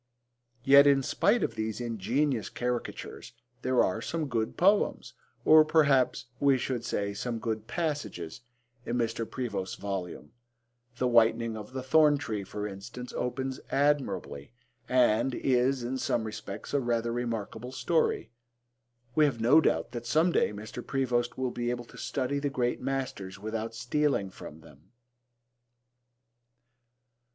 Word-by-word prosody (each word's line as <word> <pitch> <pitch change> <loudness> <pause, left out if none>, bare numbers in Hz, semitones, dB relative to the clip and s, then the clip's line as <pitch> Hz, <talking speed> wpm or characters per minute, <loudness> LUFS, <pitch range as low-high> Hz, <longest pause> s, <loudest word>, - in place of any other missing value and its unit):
Yet, 140 +1 +8
in 140 -1 +4
spite 220 - +2
of - - -1
these 110 0 -3
ingenious 120 +2 -1
caricatures 125 -1 -4 0.3
there 130 -1 +3
are 90 - -1
some 165 -2 -2
good 115 -3 -2
poems, 200 +3 +2 0.3
or 155 0 +8
perhaps 145 -5 +3
we 140 -2 +4
should 125 -2 -3
say 100 -3 -2
some 115 +3 -3
good 110 -1 -3
passages, 125 - -3 0.4
in 120 - -2
Mr. 115 -1 -1
Prevost's 100 -7 -3
volume. 95 -6 -5 0.7
The 125 - +1
Whitening 115 -1 +3
of 105 +3 -9
the 130 -1 -4
Thorn 150 +2 +5
tree, 110 -8 -4
for 105 +2 -5
instance, 105 +5 -8
opens 130 +1 -3
admirably, 130 - 0 0.4
and 125 0 +3
is, 130 0 +1
in 130 +2 -3
some 115 - 0
respects, 110 0 -7
a 140 - +3
rather 120 -2 0
remarkable 120 0 -4
story. 145 -7 0 0.8
We 155 +2 +5
have 135 -5 -1
no 130 +8 +6
doubt - - 0
that 120 -1 -6
some 160 +7 +3
day - - +2
Mr. 105 +4 -7
Prevost 125 -3 -1
will 130 -1 -1
be 120 0 -2
able 120 0 -3
to - - -15
study 140 +1 -1
the 145 0 -1
great 125 -2 -1
masters 130 -8 -3
without 110 +2 -4
stealing 120 -4 0
from 80 -3 -11
them. 75 +3 -18
120 Hz, 140 wpm, -29 LUFS, 110-135 Hz, 0.8 s, Yet